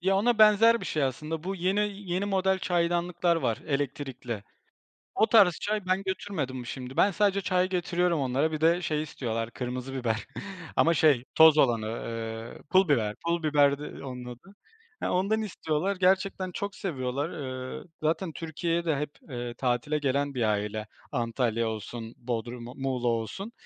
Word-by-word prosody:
Ya, 195 Hz, +2 st, +2 dB
ona 225 Hz, +2 st, +2 dB
benzer 220 Hz, +2 st, +6 dB
bir -, -, -5 dB
şey 155 Hz, -, -1 dB
aslında. 155 Hz, +5 st, -2 dB
Bu 195 Hz, +1 st, -2 dB
yeni 190 Hz, +3 st, +1 dB, 0.3 s
yeni 185 Hz, +3 st, 0 dB
model 190 Hz, -1 st, +1 dB
çaydanlıklar 175 Hz, 0 st, +1 dB
var 115 Hz, -8 st, 0 dB
elektrikli. 135 Hz, -6 st, -3 dB, 0.7 s
O 220 Hz, -, +4 dB
tarz 205 Hz, -6 st, +6 dB
çay 210 Hz, -2 st, -1 dB
ben 185 Hz, +1 st, +1 dB
götürmedim 155 Hz, -10 st, -3 dB
şimdi. 130 Hz, +1 st, -7 dB
Ben 200 Hz, -, +5 dB
sadece 200 Hz, +1 st, +2 dB
çay 185 Hz, 0 st, +1 dB
getiriyorum 175 Hz, -2 st, +1 dB
onlara; 135 Hz, +4 st, +1 dB
bir 155 Hz, 0 st, -3 dB
de 170 Hz, +2 st, +4 dB
şey 155 Hz, -3 st, -1 dB
istiyorlar 115 Hz, -6 st, -3 dB
kırmızı 125 Hz, +2 st, -5 dB
biber 115 Hz, -4 st, -2 dB, 0.5 s
ama 165 Hz, -, +4 dB
şey 145 Hz, -6 st, +4 dB
toz 160 Hz, -1 st, +8 dB
olanı, 115 Hz, -6 st, +3 dB
eee, 115 Hz, 0 st, -5 dB
pul 190 Hz, +1 st, +5 dB
biber. 110 Hz, -6 st, +2 dB
Pul 170 Hz, -1 st, 0 dB
biberdi 145 Hz, -1 st, +2 dB
onun 125 Hz, -2 st, -6 dB
adı. 125 Hz, +12 st, -11 dB, 0.5 s
Eee, -, -, 0 dB
ondan 200 Hz, +4 st, +1 dB
istiyorlar. 185 Hz, -2 st, -1 dB
Gerçekten 185 Hz, 0 st, +1 dB
çok 200 Hz, +2 st, -4 dB
seviyorlar, 140 Hz, -3 st, -2 dB, 0.5 s
eee, -, -, -12 dB, 0.2 s
zaten 165 Hz, +3 st, 0 dB
Türkiye'ye 170 Hz, +2 st, -2 dB
de 160 Hz, -, +2 dB
hep, 150 Hz, +1 st, -2 dB, 0.2 s
eee, 120 Hz, -1 st, -4 dB
tatile 125 Hz, +4 st, 0 dB
gelen 140 Hz, 0 st, 0 dB
bir 125 Hz, -3 st, -1 dB
aile. 105 Hz, +1 st, -2 dB, 0.2 s
Antalya 115 Hz, -1 st, 0 dB
olsun, 110 Hz, +1 st, -6 dB
Bodrum 120 Hz, 0 st, -4 dB, 0.2 s
Muğla 130 Hz, -2 st, -1 dB
olsun. 115 Hz, -, -2 dB
150 Hz, 155 wpm, -28 LUFS, 125-185 Hz, 0.7 s, toz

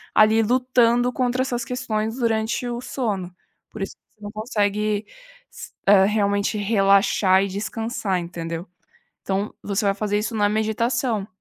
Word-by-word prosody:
ali 215 Hz, +1 st, +5 dB
lutando 245 Hz, 0 st, +2 dB
contra 255 Hz, 0 st, 0 dB
essas 245 Hz, -2 st, -2 dB
questões 225 Hz, -3 st, -2 dB
durante 230 Hz, 0 st, 0 dB
o 240 Hz, 0 st, -4 dB
sono, 200 Hz, -9 st, -3 dB, 0.4 s
por 220 Hz, -, -8 dB
isso -, -, -6 dB
que -, -, -44 dB
você 215 Hz, -, -35 dB
não 205 Hz, 0 st, -7 dB
consegue 210 Hz, -1 st, -1 dB, 0.5 s
s -, -, -10 dB, 0.2 s
é, 195 Hz, -1 st, +7 dB
realmente 200 Hz, 0 st, +1 dB
relaxar 195 Hz, -2 st, +3 dB
e -, -, -1 dB
descansar, 210 Hz, 0 st, -2 dB
entendeu? 170 Hz, 0 st, -5 dB, 0.6 s
Então 195 Hz, +2 st, -2 dB
você 200 Hz, +1 st, -1 dB
vai 195 Hz, -, +2 dB
fazer 205 Hz, 0 st, -1 dB
isso 215 Hz, +2 st, -3 dB
na 205 Hz, -1 st, +2 dB
meditação. 220 Hz, +1 st, 0 dB
215 Hz, 145 wpm, -23 LUFS, 200-235 Hz, 0.6 s, é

